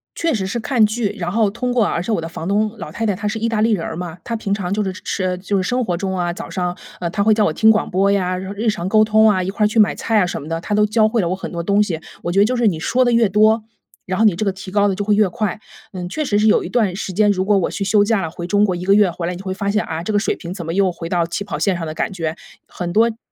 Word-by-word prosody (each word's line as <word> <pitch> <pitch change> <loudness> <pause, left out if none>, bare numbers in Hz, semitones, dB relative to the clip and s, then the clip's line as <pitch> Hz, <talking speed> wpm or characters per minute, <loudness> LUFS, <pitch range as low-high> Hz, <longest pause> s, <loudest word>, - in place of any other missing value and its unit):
确 330 -1 0
实 195 -5 -1
是 200 - -3
看 235 -1 +2
剧， 215 0 -1
然 175 -1 -2
后 215 +1 +2
通 250 +3 -2
过 240 -2 +3
啊 - - 0
而 170 - -1
且 220 +6 -2
我 190 - 0
的 165 - -5
房 165 0 -6
东 210 +2 +1
老 175 - -7
太 225 - -2
太 205 - +1
她 205 +3 -4
是 220 +2 -2
意 230 +1 -1
大 225 - -1
利 225 +2 +3
人 170 -5 -1
儿 - - -5
嘛， 175 -2 -6
她 230 -1 -3
平 200 -2 -2
常 195 -2 -2
就 210 - 0
是 190 - -2
吃 185 - -4
呃， 180 -1 -1
就 195 +2 -2
是 190 - 0
生 250 +6 0
活 180 -6 -2
中 190 +1 -3
啊， 175 -1 -1
早 215 +6 -7
上， 180 -1 -3 0.2
呃， 170 - -1
她 200 +4 -2
会 215 +2 +4
叫 215 0 +2
我 - - +2
听 220 +8 +4
广 220 0 +2
播 195 +2 +2
呀， 185 -2 0
然 190 +1 -6
后 200 - -6
日 225 +2 +1
常 190 -4 -2
沟 215 +2 +4
通 220 0 +4
啊， 185 -3 +1
一 185 - -3
块 210 +2 +1
儿 - - +5
去 220 +2 0
买 210 - +5
菜 225 - 0
啊 - - +3
什 175 - -4
么 145 - -9
的， 165 +1 -3
她 210 - -4
都 210 0 +4
教 215 +1 +2
会 230 0 +1
了 175 - -1
我 180 - -1
很 190 - -7
多 170 -1 -3
东 200 +4 +2
西。 170 -6 -3 0.2
我 175 - -3
觉 195 - +2
得 200 - +6
就 250 +3 0
是 235 -2 +2
你 170 -6 0
说 250 +10 +2
得 245 - +2
越 230 -1 +4
多， 215 +2 +3 0.4
然 185 0 -2
后 220 - +3
你 215 -4 +5
这 185 +6 -2
个 195 - 0
提 190 0 -9
高 205 +1 +3
得 195 - 0
就 205 - -3
会 210 +1 +2
越 210 0 +4
快。 195 +3 -3 0.3
嗯， 180 -2 -5
确 305 +12 -3
实 205 -8 +1
是 215 - +3
有 215 - +4
一 - - -6
段 215 -7 +1
时 190 -1 -4
间， 210 +3 +3
如 185 -2 +1
果 205 0 +3
我 190 - 0
去 200 - -3
休 205 +1 +3
假 220 -2 +1
了， 160 -2 -4
回 170 0 -6
中 205 +2 +3
国 195 -3 +2
1 180 - -6
个 195 - +4
月 205 -4 +4
回 170 0 -4
来， 180 - -2
你 175 - -7
就 195 - -9
会 190 - -2
发 200 +1 -3
现， 210 +1 +1
啊， 160 0 -4
这 215 - -3
个 205 - +3
水 205 - -1
平 175 0 -7
怎 175 -3 -7
么 165 - -3
又 195 0 +2
回 170 -1 -6
到 175 -2 +1
起 170 +4 -4
跑 200 - -5
线 195 -3 +1
上 170 -1 -4
的 155 - -5
感 175 - -2
觉， 165 -4 -3 0.3
很 175 -1 -5
多 230 +2 +4
词 225 - -8
200 Hz, 380 characters per minute, -19 LUFS, 180-215 Hz, 0.4 s, 得